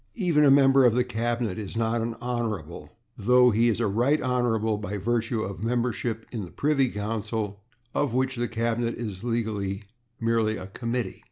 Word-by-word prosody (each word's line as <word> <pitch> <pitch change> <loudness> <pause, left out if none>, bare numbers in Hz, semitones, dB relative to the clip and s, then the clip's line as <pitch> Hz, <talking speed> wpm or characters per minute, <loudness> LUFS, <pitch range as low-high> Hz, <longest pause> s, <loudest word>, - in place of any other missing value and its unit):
Even 175 -8 +2
a 145 - +6
member 135 -1 +6
of 120 -2 +5
the 125 - +3
cabinet 115 -3 -2
is 105 +1 -6
not 115 0 +1
an 115 0 -3
/Hon./, 110 -10 -4 0.3
though 125 +3 +5
he 115 +2 +3
is 115 - 0
a - - +1
/Right 120 +8 +2
Hon./ 115 -4 +1
by 105 0 -4
virtue 115 +2 -1
of 100 +1 -6
membership 115 -1 -1
in 110 -4 -4
the 90 - -8
Privy 140 - +1
Council, 105 -1 -3 0.3
of 145 - 0
which 130 +1 +1
the 120 0 -1
Cabinet 115 0 -1
is 105 -4 -6
legally 110 -4 -2 0.4
merely 115 -1 +1
a 90 - -7
committee. 115 +1 -3
115 Hz, 175 wpm, -26 LUFS, 110-125 Hz, 0.4 s, a